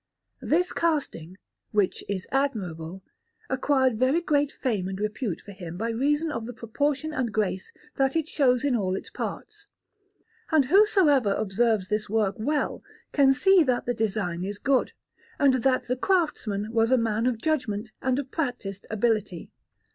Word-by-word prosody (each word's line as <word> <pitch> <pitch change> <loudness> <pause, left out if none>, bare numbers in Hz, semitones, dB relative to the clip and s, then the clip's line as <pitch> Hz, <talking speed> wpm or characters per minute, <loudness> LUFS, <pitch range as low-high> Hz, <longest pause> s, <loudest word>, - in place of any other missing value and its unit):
This 355 +3 +1
casting, 275 - -1 0.3
which 205 -3 0
is 195 -2 -3
admirable, 190 - -2 0.5
acquired 260 -3 +2
very 260 +6 +3
great 290 -4 +1
fame 210 -9 -2
and 190 0 -5
repute 210 -2 -2
for 205 - -11
him 175 -3 -8
by 230 +4 -2
reason 295 +7 0
of 230 -4 -4
the 245 - -6
proportion 285 +7 -2
and 250 -5 -1
grace 200 -3 -2 0.3
that 270 +1 +1
it 320 -2 0
shows 255 -4 +2
in 275 -3 +2
all 190 -4 0
its - - -7
parts; 410 -1 -6 0.8
and 310 -4 +4
whosoever 305 - +4
observes 215 -1 0
this 210 -1 -1
work 210 -2 +1
well 290 +7 -1 0.3
can 275 -2 +5
see 385 +7 +5
that 255 -5 +1
the 245 - 0
design 200 -6 -2
is 200 +2 -4
good, 270 +3 +1 0.4
and 280 -3 +4
that 260 +1 +2
the 250 - -1
craftsman 245 - 0
was 225 0 +3
a 260 - +4
man 225 0 0
of 240 -3 0
judgment 230 -8 -1
and 260 0 +1
of 275 -2 -4
practised 245 - -4
ability. 215 -5 -1
240 Hz, 160 wpm, -26 LUFS, 205-285 Hz, 0.8 s, can